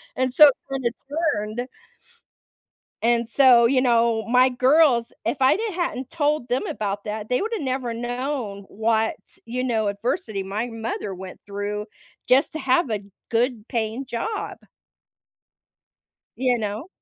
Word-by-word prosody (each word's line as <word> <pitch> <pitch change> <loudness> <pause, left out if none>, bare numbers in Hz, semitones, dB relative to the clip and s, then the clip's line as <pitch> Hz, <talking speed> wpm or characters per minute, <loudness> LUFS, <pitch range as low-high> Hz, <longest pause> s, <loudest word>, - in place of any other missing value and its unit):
And 255 -1 0
so 300 +2 +9
it 275 - +4 0.2
kinda 265 -3 -1 0.4
turned 215 +4 -4 1.4
and 235 0 +2
so, 245 -2 +6
you 255 +1 +3
know, 230 -2 +2
my 250 +1 +5
girls, 255 -1 +3
if 250 +4 -1
I 260 - +5
didn't 435 -3 -3
hadn't 270 -7 -3
told 300 -5 0
them 250 +2 0
about 205 -1 -3
that, 210 0 -5
they 250 - +1
woulda 440 -6 -2
never 255 -2 -2
known 240 -3 -3
what, 220 +1 0 0.3
you 250 +2 -3
know, 220 -4 0
adversity 215 - -2
my 205 +5 -3
mother 225 -3 -4
went 185 0 -9
through 205 +1 -4 0.4
just 270 +4 +3
to - - -2
have 265 0 +2
a 205 -2 -2 0.3
good 235 -1 0
paying 230 +2 -2
job. 415 - -4 1.8
You 250 -1 +2
know? 215 - -4
240 Hz, 140 wpm, -23 LUFS, 220-265 Hz, 1.8 s, so